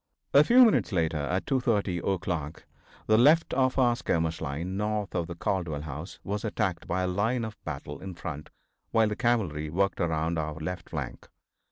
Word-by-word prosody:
A 140 - +8
few 250 +7 +7
minutes 220 - +2
later, 80 -4 0
at 90 +6 -1
2:30 105 - 0
o'clock, 85 -5 -4 0.4
the 110 0 +4
left 155 +6 +5
of 130 0 +2
our 120 -2 +4
skirmish 80 -6 -1
line, 85 +7 -3
north 105 0 -2
of 85 -2 -1
the 85 - -6
Caldwell 85 -4 -2
house, 75 +3 -7
was 105 +2 -3
attacked 95 -5 -2
by 95 +1 0
a - - 0
line 110 +6 0
of 110 -1 -9
battle 75 -1 -6
in 95 -1 -7
front 75 -3 -6 0.4
while 110 -1 +3
the 105 - -2
cavalry 100 - 0
worked 100 +5 0
around 80 0 0
our 75 -1 -3
left 85 +3 -5
flank. 75 -6 -6
90 Hz, 180 wpm, -28 LUFS, 80-110 Hz, 0.4 s, A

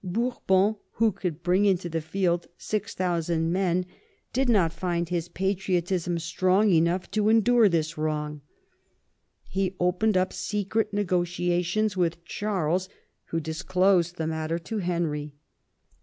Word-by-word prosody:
Bourbon, 205 0 +1 0.2
who 225 0 +3
could 175 -4 -5
bring 185 +3 +3
into 190 -3 +2
the 165 -1 -2
field 175 +1 -1
6000 175 -6 -1
men, 180 -1 +1 0.5
did 265 0 +1
not 185 -8 +3
find 170 0 -1
his 175 -1 -2
patriotism 180 -2 -1
strong 185 +5 +2
enough 170 +2 +2
to 215 0 +2
endure 225 0 +5
this 160 -2 -1
wrong. 150 -1 -2 1.1
He 190 -1 -1
opened 185 +4 +2
up 185 0 +1
secret 210 +2 -1
negotiations 180 +1 0
with 170 -2 -1
Charles, 185 -2 -1 0.4
who 165 - -2
disclosed 175 +2 +1
the 160 - -3
matter 160 +1 -2
to 210 +6 -4
Henry. 165 -5 -2
180 Hz, 125 wpm, -26 LUFS, 170-195 Hz, 1.1 s, endure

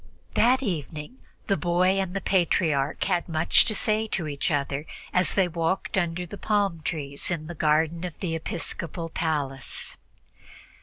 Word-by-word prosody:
That 255 +4 +4
evening 160 - -4 0.3
the 195 - +2
boy 185 +2 +2
and 190 0 -4
the 195 - -1
Patriarch 160 -6 +2
had 180 -3 0
much 160 0 +4
to 215 - +1
say 215 +1 +1
to 175 -6 -2
each 145 -1 -1
other 145 0 -1 0.3
as 180 -3 +2
they 190 -2 +4
walked 170 +2 -1
under 175 -1 0
the 195 +4 -9
palm 200 -6 +1
trees 145 -3 -3
in 165 -3 -2
the 170 - -6
garden 160 +2 +2
of 180 -3 -5
the 175 -4 -2
episcopal 165 0 -4
palace. 145 -5 -2
170 Hz, 155 wpm, -26 LUFS, 155-190 Hz, 0.3 s, That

